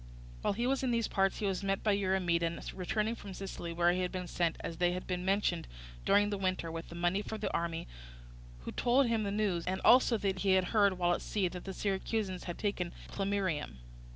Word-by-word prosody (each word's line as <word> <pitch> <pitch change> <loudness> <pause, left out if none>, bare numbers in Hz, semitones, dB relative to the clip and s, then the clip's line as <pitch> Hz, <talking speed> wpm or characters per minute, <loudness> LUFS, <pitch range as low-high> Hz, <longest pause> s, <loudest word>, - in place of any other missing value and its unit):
While - - +1
he 235 +4 -1
was 270 +2 +1
in 260 - 0
these 230 -2 +1
parts 195 -1 +1
he 215 - -2
was 195 -1 0
met 195 0 -1
by 215 - +3
Eurymedon 175 -4 +1
returning 210 +4 -1
from 200 -5 -8
Sicily, 190 -3 -5
where 170 +1 +3
he 180 +1 0
had 180 - -1
been 185 -1 -4
sent, 170 -1 0
as 165 - -4
has 180 +1 +1
been 180 -1 -3
mentioned, 190 -3 +1 0.4
during 205 +1 +4
the 200 - -2
winter, 185 -3 -1
with 165 0 -6
the 170 - -9
money 175 +3 +1
for 220 - -5
the - - -3
army, 170 -1 -2 0.7
who - - -6
told 255 +3 +3
him 230 -2 +1
the 205 - -1
news, 200 -5 0
and 190 +1 0
also 245 -1 +6
that 195 -2 -1
he 195 0 +3
had 185 -1 +3
heard, 200 -3 +5
while 175 -1 +2
at - - -2
sea, 200 -3 0
that 180 0 -8
the 195 - -4
Syracusans 195 -1 -2
had 175 - -5
taken 185 -4 -2 0.2
Plemmyrium. 195 - -1
190 Hz, 220 wpm, -32 LUFS, 175-205 Hz, 0.7 s, also